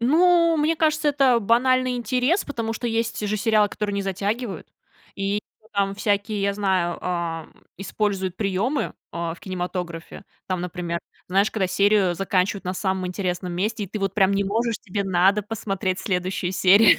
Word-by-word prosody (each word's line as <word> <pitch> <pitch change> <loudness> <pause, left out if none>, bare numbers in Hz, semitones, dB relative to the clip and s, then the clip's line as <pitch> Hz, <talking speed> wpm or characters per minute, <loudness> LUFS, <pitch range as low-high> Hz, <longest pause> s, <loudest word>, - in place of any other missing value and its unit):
Ну, 335 +5 +4
мне 315 +2 +2
кажется, 310 -1 +2
это 270 -4 +4
банальный 250 +3 +3
интерес, 250 - +1
потому 230 -5 -3
что 235 +2 -4
есть 225 -2 -1
же 215 - 0
сериалы, 215 -1 +3
которые 205 0 -3
не 200 - -1
затягивают, 200 +3 -3 0.5
и 200 +1 -1 0.3
там 195 0 0
всякие, 205 +1 0
я 200 0 +1
знаю, 190 -4 0
а, 170 -3 -3 0.3
используют 195 -2 -2
приемы, 210 +8 -1 0.2
а, 170 -1 -3
в - - -18
кинематографе. 180 -2 -5 0.2
Там, 185 -2 -1
например, 175 -1 -3 0.3
знаешь, 195 +3 +3
когда 195 -4 0
серию 200 -1 +3
заканчивают 195 +1 0
на 185 +1 -2
самом 190 -1 -1
интересном 180 -1 -3
месте, 210 +4 -1
и - - -8
ты 215 - -5
вот 195 -1 -1
прям 195 -2 +4
не 200 0 +1
можешь, 225 +3 0
тебе 200 +1 -3
надо 195 +2 +3
посмотреть 195 -3 -2
следующую 185 -1 -1
серию. 190 +4 +6
200 Hz, 165 wpm, -24 LUFS, 185-225 Hz, 0.5 s, серию